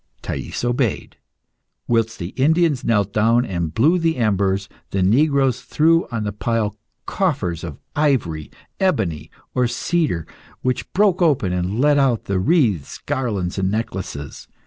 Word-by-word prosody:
Thais -, -, -4 dB
obeyed. 120 Hz, -2 st, -1 dB, 0.7 s
Whilst 115 Hz, -1 st, +1 dB
the 85 Hz, -1 st, -5 dB
Indians 155 Hz, -, +2 dB
knelt 105 Hz, -3 st, +1 dB
down 115 Hz, +3 st, +3 dB
and 85 Hz, -7 st, -2 dB
blew 155 Hz, -, +3 dB
the 165 Hz, -1 st, +1 dB
embers, 100 Hz, -3 st, +1 dB, 0.2 s
the 95 Hz, -1 st, 0 dB
negroes 135 Hz, +4 st, +3 dB
threw 165 Hz, +2 st, +2 dB
on 115 Hz, -3 st, -3 dB
the 105 Hz, -, -2 dB
pile 105 Hz, 0 st, -1 dB, 0.3 s
coffers 130 Hz, -, -1 dB
of 80 Hz, -5 st, -6 dB, 0.2 s
ivory, 105 Hz, -, 0 dB, 0.3 s
ebony, 110 Hz, -, 0 dB, 0.2 s
or 125 Hz, -1 st, +2 dB
cedar, 150 Hz, -, -1 dB, 0.4 s
which 130 Hz, 0 st, -1 dB
broke 195 Hz, -2 st, +3 dB
open 135 Hz, -, +2 dB
and 90 Hz, +5 st, -1 dB
let 145 Hz, +1 st, +4 dB
out 125 Hz, -7 st, +2 dB
wreaths, 100 Hz, -, +1 dB
garlands, 100 Hz, -8 st, -2 dB
and 95 Hz, 0 st, +1 dB
necklaces. 95 Hz, -9 st, -4 dB
115 Hz, 135 wpm, -21 LUFS, 95-145 Hz, 0.7 s, let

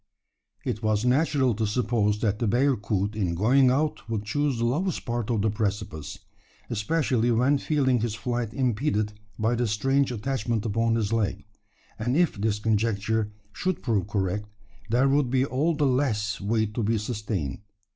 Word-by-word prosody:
It 110 Hz, -, -2 dB
was 110 Hz, 0 st, +1 dB
natural 135 Hz, -1 st, +3 dB
to 110 Hz, +1 st, -1 dB
suppose 105 Hz, -2 st, +1 dB
that 105 Hz, -2 st, 0 dB
the 115 Hz, -, 0 dB
bearcoot 105 Hz, -5 st, +1 dB
in 90 Hz, -6 st, -1 dB
going 125 Hz, +8 st, +4 dB
out 145 Hz, -3 st, 0 dB
would 110 Hz, -2 st, -2 dB
choose 145 Hz, +4 st, 0 dB
the 115 Hz, -, 0 dB
lowest 160 Hz, +9 st, -1 dB
part 120 Hz, -1 st, -2 dB
of 110 Hz, -4 st, +1 dB
the 110 Hz, -, +2 dB
precipice 100 Hz, -7 st, -3 dB, 0.5 s
especially 120 Hz, +1 st, +1 dB
when 125 Hz, +5 st, +3 dB
feeling 130 Hz, -5 st, +1 dB
his 115 Hz, -2 st, -1 dB
flight 120 Hz, 0 st, -2 dB
impeded 115 Hz, -4 st, 0 dB, 0.2 s
by 110 Hz, +2 st, +1 dB
the 120 Hz, 0 st, 0 dB
strange 135 Hz, +6 st, +1 dB
attachment 115 Hz, -2 st, -2 dB
upon 115 Hz, +1 st, +1 dB
his 110 Hz, -1 st, 0 dB
leg; 110 Hz, -3 st, -1 dB, 0.5 s
and 120 Hz, +5 st, 0 dB
if 175 Hz, -1 st, +3 dB
this 105 Hz, -1 st, +1 dB
conjecture 110 Hz, 0 st, 0 dB, 0.2 s
should 185 Hz, -, -2 dB
prove 105 Hz, -6 st, 0 dB
correct, 105 Hz, 0 st, -1 dB, 0.4 s
there 125 Hz, +4 st, +3 dB
would 140 Hz, -1 st, +2 dB
be 130 Hz, +1 st, +2 dB
all 150 Hz, +5 st, 0 dB
the 150 Hz, -, +1 dB
less 125 Hz, -7 st, 0 dB
weight 110 Hz, +1 st, 0 dB
to 115 Hz, -, -2 dB
be 110 Hz, +1 st, +1 dB
sustained. 105 Hz, -, -3 dB
115 Hz, 165 wpm, -26 LUFS, 105-130 Hz, 0.5 s, going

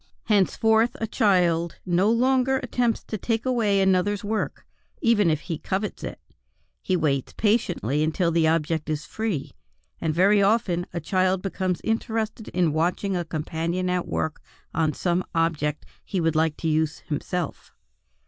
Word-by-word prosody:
Henceforward 220 Hz, +2 st, +3 dB
a 225 Hz, -, -3 dB
child 175 Hz, -6 st, +2 dB
no 180 Hz, +3 st, +2 dB
longer 260 Hz, +3 st, +3 dB
attempts 240 Hz, -2 st, 0 dB
to 215 Hz, -, -5 dB
take 225 Hz, +3 st, -1 dB
away 225 Hz, -6 st, +2 dB
another's 190 Hz, +1 st, +2 dB
work; 215 Hz, +1 st, -3 dB, 0.3 s
even 210 Hz, -6 st, +3 dB
if 155 Hz, -1 st, 0 dB
he 165 Hz, -4 st, -4 dB
covet 200 Hz, +2 st, -3 dB
it, -, -, -6 dB, 0.6 s
he 185 Hz, -, 0 dB
waits 140 Hz, -5 st, 0 dB
patiently 180 Hz, -, +1 dB
until 165 Hz, +2 st, +1 dB
the 165 Hz, -1 st, +3 dB
object 160 Hz, -1 st, 0 dB
is 155 Hz, -1 st, -2 dB
free; 215 Hz, -10 st, -3 dB, 0.5 s
and 160 Hz, -, 0 dB
very 195 Hz, +6 st, +4 dB
often 195 Hz, -4 st, +2 dB
a 175 Hz, -, -3 dB
child 185 Hz, +3 st, +1 dB
becomes 185 Hz, -2 st, -2 dB
interested 225 Hz, 0 st, -2 dB
in 175 Hz, -4 st, +1 dB
watching 180 Hz, +5 st, 0 dB
a 175 Hz, -, 0 dB
companion 165 Hz, +3 st, -2 dB
at 180 Hz, -1 st, -1 dB
work 160 Hz, -1 st, -2 dB, 0.3 s
on 160 Hz, -1 st, +1 dB
some 175 Hz, +3 st, 0 dB
object 155 Hz, -3 st, 0 dB, 0.2 s
he 190 Hz, -, -2 dB
would 165 Hz, -2 st, +1 dB
like 160 Hz, -1 st, +1 dB
to 165 Hz, -, -3 dB
use 155 Hz, 0 st, 0 dB
himself. 160 Hz, +2 st, -4 dB
180 Hz, 150 wpm, -25 LUFS, 160-210 Hz, 0.6 s, very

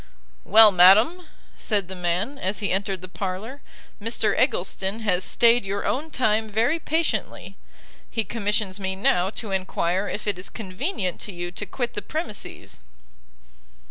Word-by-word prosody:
"Well, 220 Hz, +1 st, +8 dB
madam," 215 Hz, -, +5 dB, 0.3 s
said 205 Hz, -5 st, -1 dB
the 190 Hz, -, -6 dB
man, 180 Hz, +10 st, -2 dB
as 190 Hz, +3 st, -1 dB
he 205 Hz, -, -2 dB
entered 190 Hz, -1 st, -1 dB
the -, -, -6 dB
parlour, 195 Hz, +8 st, -5 dB, 0.4 s
"Mr 225 Hz, 0 st, 0 dB
Eggleston 195 Hz, +4 st, 0 dB
has 185 Hz, -4 st, +1 dB
stayed 235 Hz, +3 st, +4 dB
your 200 Hz, +1 st, -3 dB
own 300 Hz, +5 st, -1 dB
time 220 Hz, -5 st, +1 dB
very 230 Hz, +10 st, +1 dB
patiently: 320 Hz, +1 st, -2 dB, 0.5 s
he 225 Hz, -, -1 dB
commissions 210 Hz, -3 st, -1 dB
me 190 Hz, -1 st, -2 dB
now 185 Hz, -1 st, +2 dB
to 215 Hz, 0 st, -6 dB
enquire 190 Hz, 0 st, -1 dB
if 210 Hz, -, -5 dB
it 205 Hz, -3 st, -1 dB
is 180 Hz, -, -6 dB
convenient 195 Hz, -, -4 dB
to 210 Hz, -, -4 dB
you 175 Hz, -1 st, -5 dB
to 205 Hz, +3 st, -5 dB
quit 245 Hz, -2 st, -3 dB
the 205 Hz, -, -4 dB
premises." 310 Hz, -, -6 dB
205 Hz, 150 wpm, -24 LUFS, 190-230 Hz, 0.5 s, Well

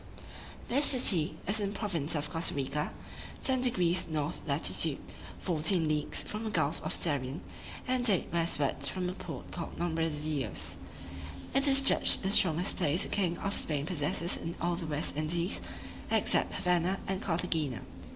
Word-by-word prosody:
This 280 Hz, +4 st, +2 dB
city 200 Hz, -, +2 dB
is 205 Hz, +3 st, +1 dB
in 200 Hz, -1 st, -2 dB
the -, -, -6 dB
province 170 Hz, -7 st, -1 dB
of 150 Hz, -1 st, -1 dB
Costa 165 Hz, -1 st, -1 dB
Rica, 140 Hz, +2 st, -2 dB, 0.5 s
10 260 Hz, -1 st, +2 dB
deg. 180 Hz, -8 st, +1 dB
north 155 Hz, +1 st, -2 dB
latitude, 145 Hz, +1 st, +2 dB, 0.4 s
fourteen 165 Hz, 0 st, +2 dB
leagues 150 Hz, -1 st, 0 dB
from 215 Hz, +1 st, -5 dB
the 220 Hz, -, -2 dB
gulf 160 Hz, -5 st, 0 dB
of -, -, -4 dB
Darien, 140 Hz, -3 st, -1 dB, 0.5 s
and 250 Hz, -2 st, +2 dB
eight 190 Hz, -, +2 dB
westwards 150 Hz, -5 st, +1 dB
from 185 Hz, -1 st, -3 dB
the 180 Hz, -, -2 dB
port 160 Hz, -7 st, -8 dB
called 170 Hz, -2 st, -6 dB
Nombre 165 Hz, -1 st, 0 dB
de 150 Hz, -, -5 dB
Dios. 145 Hz, -8 st, -2 dB, 0.8 s
It 275 Hz, +1 st, +3 dB
is 275 Hz, 0 st, +9 dB
judged 270 Hz, -, +5 dB
the 190 Hz, -, +1 dB
strongest 180 Hz, -2 st, +3 dB
place 170 Hz, 0 st, +2 dB
the -, -, -3 dB
king 180 Hz, -4 st, 0 dB
of 200 Hz, +1 st, -3 dB
Spain 145 Hz, -2 st, -2 dB
possesses 170 Hz, 0 st, 0 dB
in 165 Hz, +1 st, -5 dB
all 175 Hz, 0 st, 0 dB
the 170 Hz, -2 st, -5 dB
West 150 Hz, -1 st, -2 dB
Indies, 170 Hz, +5 st, -1 dB, 0.5 s
except -, -, +2 dB
Havanna 180 Hz, +1 st, +1 dB
and 190 Hz, 0 st, -2 dB
Carthagena. 165 Hz, -7 st, -1 dB
170 Hz, 165 wpm, -31 LUFS, 150-190 Hz, 0.8 s, is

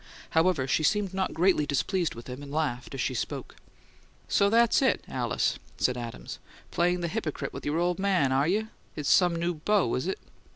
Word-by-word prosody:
However, 160 Hz, -5 st, +2 dB
she 145 Hz, -, +2 dB
seemed 195 Hz, +3 st, +1 dB
not 190 Hz, 0 st, -1 dB
greatly 170 Hz, -3 st, +3 dB
displeased 170 Hz, +5 st, 0 dB
with 115 Hz, -, -9 dB
him, 125 Hz, +2 st, -7 dB
and 140 Hz, -1 st, -9 dB
laughed 140 Hz, -4 st, -2 dB
as 135 Hz, -, -2 dB
she 130 Hz, -, -1 dB
spoke. 120 Hz, -, -4 dB, 0.7 s
"So 200 Hz, -, +3 dB
that's 230 Hz, +3 st, +4 dB
it, 265 Hz, -, +2 dB
Alice!" -, -, -1 dB, 0.2 s
said 125 Hz, -, +1 dB
Adams. 115 Hz, -, -7 dB, 0.3 s
"Playing 175 Hz, +1 st, +1 dB
the 170 Hz, -, -1 dB
hypocrite 170 Hz, -5 st, -3 dB
with -, -, -6 dB
your 150 Hz, +2 st, 0 dB
old 175 Hz, +2 st, 0 dB
man, 185 Hz, -9 st, +2 dB
are 135 Hz, +3 st, +2 dB
you? 215 Hz, +5 st, 0 dB, 0.3 s
It's 150 Hz, -3 st, -2 dB
some 175 Hz, -2 st, +5 dB
new 170 Hz, +1 st, -1 dB
beau, 170 Hz, -, +1 dB
is 130 Hz, +7 st, -1 dB
it?" 190 Hz, -, -1 dB
170 Hz, 195 wpm, -28 LUFS, 140-190 Hz, 0.7 s, some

